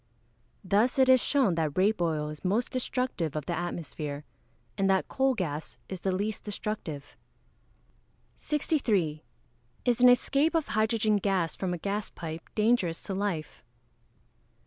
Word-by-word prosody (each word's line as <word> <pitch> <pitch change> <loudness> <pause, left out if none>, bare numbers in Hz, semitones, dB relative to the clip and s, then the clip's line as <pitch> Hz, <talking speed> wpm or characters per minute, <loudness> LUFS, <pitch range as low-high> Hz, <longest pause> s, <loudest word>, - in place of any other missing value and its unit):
Thus 210 +7 +2
it 265 -1 +5
is 255 -2 +7
shown 265 -10 +3
that 160 -2 -1
rape 200 +1 +3
oil 155 -3 0
is 150 -1 -9
most 210 +6 0
destructive 250 - -1
of 150 -2 -3
the 175 - -2
atmosphere, 155 -4 -4 0.5
and 195 -1 +1
that 190 -1 +2
coal 265 -1 +1
gas 160 -7 -4
is 190 -2 -6
the 190 - 0
least 205 +3 -2
destructive. 195 -9 -5 1.2
63. 215 - 0 0.6
_Is 245 -1 +2
an 250 - +9
escape 275 +6 +3
of 320 -3 +1
hydrogen 215 0 +2
gas 190 -5 0
from 185 -2 -2
a 175 - -2
gas 200 +4 -3
pipe 165 -1 -6
dangerous 210 -7 +2
to 195 - -3
life? 190 -5 -3
195 Hz, 145 wpm, -29 LUFS, 165-235 Hz, 1.2 s, an